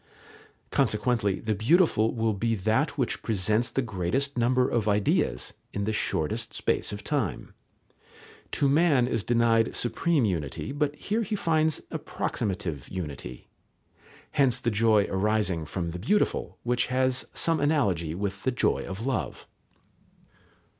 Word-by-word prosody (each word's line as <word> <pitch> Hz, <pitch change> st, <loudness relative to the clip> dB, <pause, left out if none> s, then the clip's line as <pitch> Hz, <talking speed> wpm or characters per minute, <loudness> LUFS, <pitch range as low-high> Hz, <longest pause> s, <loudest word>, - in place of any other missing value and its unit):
Consequently 105 Hz, -3 st, +1 dB
the 110 Hz, -1 st, -1 dB
beautiful 115 Hz, -, +3 dB
will 110 Hz, -1 st, +1 dB
be 115 Hz, +3 st, 0 dB
that 110 Hz, -, 0 dB
which 130 Hz, -4 st, -1 dB
presents 110 Hz, +2 st, +1 dB
the 135 Hz, -, -1 dB
greatest 110 Hz, +7 st, -1 dB
number 125 Hz, +1 st, +2 dB
of 110 Hz, -3 st, 0 dB
ideas 105 Hz, -1 st, +1 dB, 0.2 s
in 100 Hz, -, -2 dB
the 110 Hz, +2 st, -1 dB
shortest -, -, -1 dB
space -, -, 0 dB
of 100 Hz, 0 st, -7 dB
time. 140 Hz, -10 st, -2 dB, 1.0 s
To 140 Hz, -, +2 dB
man 140 Hz, -4 st, +3 dB
is 115 Hz, -4 st, -1 dB
denied 115 Hz, -1 st, +2 dB
supreme 145 Hz, +3 st, +1 dB
unity, 85 Hz, -, -3 dB
but 145 Hz, 0 st, -1 dB
here 215 Hz, +8 st, -2 dB
he 215 Hz, -1 st, -2 dB
finds 160 Hz, -4 st, +1 dB
approximative 90 Hz, -, -3 dB
unity. 75 Hz, -9 st, -7 dB, 0.8 s
Hence 125 Hz, -3 st, +3 dB
the 120 Hz, -, 0 dB
joy 105 Hz, -1 st, +3 dB
arising 95 Hz, -4 st, 0 dB
from 85 Hz, +1 st, -4 dB
the 90 Hz, -, -6 dB
beautiful, 105 Hz, -, 0 dB
which 120 Hz, 0 st, +1 dB
has 130 Hz, 0 st, 0 dB
some 165 Hz, -1 st, +2 dB
analogy 100 Hz, -, +1 dB
with 100 Hz, 0 st, -3 dB
the -, -, 0 dB
joy 125 Hz, -, +1 dB
of 100 Hz, +5 st, -6 dB
love. 135 Hz, -1 st, -3 dB
115 Hz, 135 wpm, -27 LUFS, 100-135 Hz, 1.0 s, beautiful